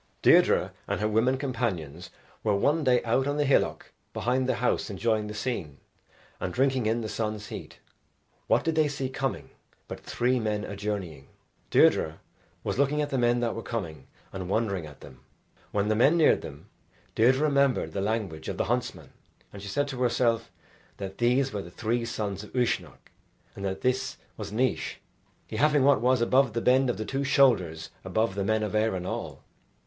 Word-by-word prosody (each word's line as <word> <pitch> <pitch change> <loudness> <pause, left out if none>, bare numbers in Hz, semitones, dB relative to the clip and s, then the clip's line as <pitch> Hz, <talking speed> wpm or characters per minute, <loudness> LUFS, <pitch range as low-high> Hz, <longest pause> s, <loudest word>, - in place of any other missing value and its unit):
Deirdre - - +5 0.2
and - - -1
her 105 - +1
women 115 +5 +2
companions 90 - -3 0.3
were 105 -2 +2
one 150 +10 +2
day 125 -2 +3
out 125 +4 +1
on 145 +1 -1
the 145 - +2
hillock 135 - +1 0.2
behind 130 +2 0
the - - +2
house 125 - 0
enjoying 110 +1 0
the 105 - -6
scene, 100 - -4 0.6
and 90 - -3
drinking 130 -3 +2
in 115 +2 +1
the 110 - -3
sun's 105 -1 -3
heat. - - -8 0.7
What - - +3
did 165 - 0
they 155 -1 +3
see 140 -2 -3
coming 135 0 -3 0.4
but - - -7
three 125 +1 0
men 105 -2 -1
a 100 - -6
journeying. 95 -9 -4 0.4
Deirdre 80 0 +3 0.4
was - - -2
looking 140 +2 +2
at 145 -1 -1
the 135 - 0
men 120 0 +2
that 115 -2 0
were 115 - -5
coming, 80 - -5 0.3
and 95 -1 -5
wondering 100 -6 -1
at 75 -2 -14
them. 65 -3 -13 0.5
When 105 0 0
the 110 - +2
men 140 +9 +4
neared 160 - +4
them, 75 0 -10 0.5
Deirdre 130 +5 +3
remembered 140 -3 +2
the 100 - -2
language 100 -7 -2
of - - -4
the - - +1
huntsman, - - -3 0.4
and 100 - -9
she 100 - -7
said 145 +8 0
to 130 -2 -5
herself 120 -2 +1 0.5
that 95 -1 -7
these 125 +2 +2
were 100 - -2
the 85 - -10
three 115 +5 -2
sons 105 -3 -4
of 105 - -13
Uisnech, 125 -2 -2 0.4
and 100 - -8
that 95 -1 -3
this 130 +1 0 0.2
was 100 -2 -7
Naois, 125 +4 0 0.5
he - - -6
having 150 -2 +4
what 140 -4 +4
was 125 0 +3
above 130 0 +3
the 115 - 0
bend 130 +2 +4
of 120 - -1
the 110 - -4
two 135 +4 -2
shoulders 95 - +2
above 95 +3 0
the 100 0 -2
men 110 +2 +1
of 105 - -3
Erin 105 -4 0
all. - - -5
115 Hz, 190 wpm, -27 LUFS, 100-130 Hz, 0.7 s, Deirdre